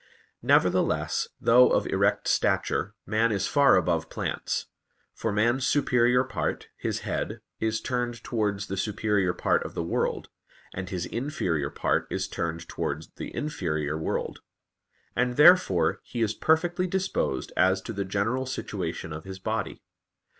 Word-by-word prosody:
Nevertheless, - - +2
though 125 +2 +6
of - - +2
erect - - +1
stature, 105 +3 +1
man 110 +3 +2
is 100 -2 0
far 140 -1 +5
above 85 -3 +1
plants. - - -3 0.5
For 115 - -2
man's 120 +5 +2
superior 125 -3 +3
part, 130 - -3
his - - -3
head, - - -3 0.2
is 110 0 0
turned 120 -2 -3
towards 105 -5 -1
the 95 - -5
superior 105 -2 +1
part - - +1
of - - -8
the 85 - -1
world, 85 - -1 0.4
and 95 0 -5
his 90 -2 -3
inferior 90 - -2
part - - 0
is - - -2
turned 85 0 -4
towards - - -4
the - - -6
inferior 75 - -2
world; 80 - -3 0.7
and 125 0 +1
therefore 105 - +5
he 120 -2 -3
is 110 -1 0
perfectly 175 +6 +1
disposed 190 +1 -1
as 95 +1 +3
to 115 - -5
the 100 -1 -2
general 105 +7 -1
situation 80 -9 -4
of 80 +2 -8
his 95 0 -7
body. 110 +3 -3
110 Hz, 145 wpm, -27 LUFS, 95-125 Hz, 0.7 s, though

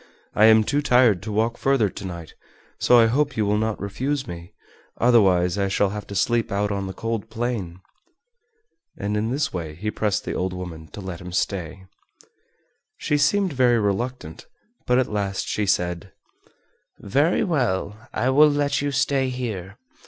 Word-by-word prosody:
I 110 - +5
am 110 0 +6
too 145 +6 0
tired 125 -9 +4
to 110 - -6
walk 110 +3 0
further 135 -6 +2
to 100 +1 -8
night, 85 -3 -8 0.5
so 125 - +5
I 115 - +7
hope 140 +3 0
you 110 - +1
will 105 +1 +1
not 110 0 -1
refuse 130 +8 -2
me, 85 -5 -9 0.5
otherwise 95 -6 +3
I 100 - +1
shall 95 +1 +1
have 105 0 -6
to 100 - -7
sleep 115 +3 +1
out 100 +1 0
on 100 -1 -2
the 95 - -6
cold 115 +1 -4
plain." 110 -7 -4 1.2
And 100 +1 -2
in 105 +2 -1
this 145 +5 -1
way 80 -4 -5
he 105 +6 -3
pressed 105 -1 -1
the - - -3
old 90 0 -2
woman 85 -4 -7
to 105 - -7
let 95 -3 -7
him 90 0 -8
stay. 95 0 -3 1.1
She 150 -2 0
seemed 185 +4 +2
very 125 -2 +3
reluctant, 105 -3 -3 0.4
but 125 - +3
at 130 - +3
last 100 -2 -2
she 105 -1 -1
said: 90 -3 -1 0.9
"Very 140 - +1
well, 115 - -2
I 130 - 0
will 150 +3 +6
let 145 -1 0
you 145 - -1
stay 135 -1 +1
here. 105 -6 -5
105 Hz, 175 wpm, -23 LUFS, 95-125 Hz, 1.2 s, I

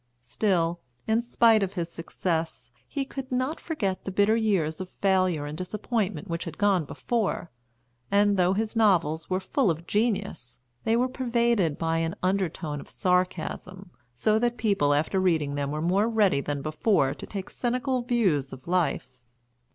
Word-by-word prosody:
Still, 170 - 0 0.3
in 220 +1 +2
spite 230 -2 +4
of 195 -1 -1
his 170 -3 -2
success, 165 -6 -3 0.2
he 275 -1 -3
could 270 -1 -7
not 255 +5 -1
forget 200 - -2
the - - -4
bitter 205 +3 +3
years 190 -8 +1
of 185 - -6
failure 185 -7 +1
and 145 +1 -5
disappointment 200 0 -2
which 170 -1 -3
had 165 -2 -7
gone 195 -5 +2
before, 215 -2 -2 0.6
and 205 0 +4
though 180 0 +3
his 220 +3 -2
novels 170 -8 +2
were 185 0 +1
full 205 +4 +1
of 165 +1 -2
genius 200 - -1 0.3
they 225 - +3
were 250 +2 +2
pervaded 235 - +1
by 165 0 0
an 165 0 -1
undertone 180 -5 -1
of - - -13
sarcasm, 185 +1 -1 0.2
so 215 - +1
that 240 +1 0
people 200 -11 +2
after 155 +6 +1
reading 160 -6 +1
them 145 -1 -2
were 150 +2 -3
more 195 +6 +2
ready 210 -10 +3
than 145 -1 -3
before 155 -2 +1
to - - -9
take 195 -2 -6
cynical 255 +1 -1
views 195 - +1
of 130 - -11
life. 165 -8 -1
185 Hz, 165 wpm, -27 LUFS, 165-220 Hz, 0.6 s, spite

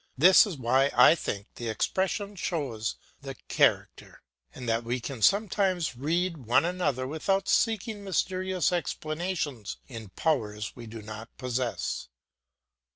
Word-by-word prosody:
This 185 - +7
is 180 -7 -5
why 130 +3 +3
I - - +8
think 100 -11 -4
the 120 -1 -4
expression 190 - -1
shows 135 - -2 0.3
the - - -7
character, - - 0 0.3
and 125 - -8
that 115 +1 +1
we 120 +2 -2
can 125 -1 -6
sometimes 195 - +2
read 165 +6 -1
one 130 +7 +4
another 175 -8 -1
without 190 +8 -1
seeking 220 -2 +1
mysterious 185 -1 0
explanations 155 - -3
in 115 -5 -9
powers 105 - -1
we 120 -2 -9
do 110 -1 -9
not 110 +2 -8
possess. 125 - -2
145 Hz, 130 wpm, -28 LUFS, 115-185 Hz, 0.3 s, I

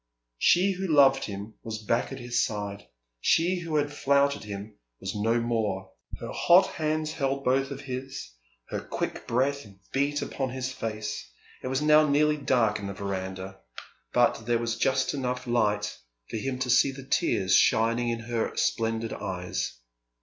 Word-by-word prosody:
She 185 +3 +4
who 190 0 -3
loved 140 -4 +5
him 100 +1 -6
was 110 -1 -5
back 115 +5 0
at 135 - -5
his 120 -1 0
side, 100 -1 -4 0.3
she 175 - +3
who 165 -2 -4
had 145 -1 +1
flouted 140 0 +2
him 105 0 -7 0.2
was 95 - -4
no 115 +3 +1
more. 110 -5 -1 0.3
Her - - -6
hot 180 +2 +6
hands 155 0 -1
held 140 -3 -1
both 135 +2 +2
of 140 0 -6
his. 135 - -6 0.4
Her - - -2
quick - - -4
breath 140 +4 +1 0.3
beat 145 +2 +1
upon 135 -2 -3
his 130 +1 -3
face. 105 - -4 0.3
It - - -5
was 135 +3 0
now 155 0 +6
nearly 150 +1 +3
dark 120 -7 +2
in 100 - -5
the 100 - -4
verandah, 95 -1 -5 0.5
but 110 - +2
there 120 -1 +3
was 115 0 -1
just 130 0 +1
light 145 - -3
enough 125 -1 -2
for 105 - -2
him 130 +3 -2
to 130 0 -2
see 135 - +5
the 135 0 -10
tears 95 -7 +2
shining 115 +2 +3
in 115 0 -2
her 115 0 -2
splendid 115 0 0
eyes. 90 -3 -3
120 Hz, 165 wpm, -27 LUFS, 105-140 Hz, 0.5 s, hot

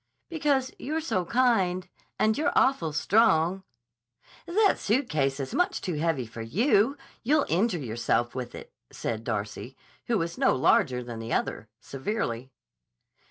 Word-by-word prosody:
"Because 285 -5 0
you're 310 +4 -2
so 190 - -1
kind. 195 -6 +2 0.3
And 215 0 +2
you're 305 - +1
awful 180 - +3
strong." 180 +1 +3 0.9
"That 405 +4 +3
suitcase 155 - 0
is 135 -1 -4
much 360 0 +1
too 180 - -3
heavy 155 -4 0
for 115 0 -9
you. 220 - +2 0.2
You'll 290 +4 +2
injure 185 +3 +1
yourself 120 -2 -1
with 125 -2 -5
it," - - -11 0.2
said 110 -1 -4
Darcy, 110 +3 -4 0.3
who 235 - +2
was 170 -1 -3
no - - +4
larger 125 -1 +2
than 120 -2 -7
the 115 +1 -4
other, 110 - -2
severely. 135 - -4
175 Hz, 140 wpm, -27 LUFS, -, 0.9 s, no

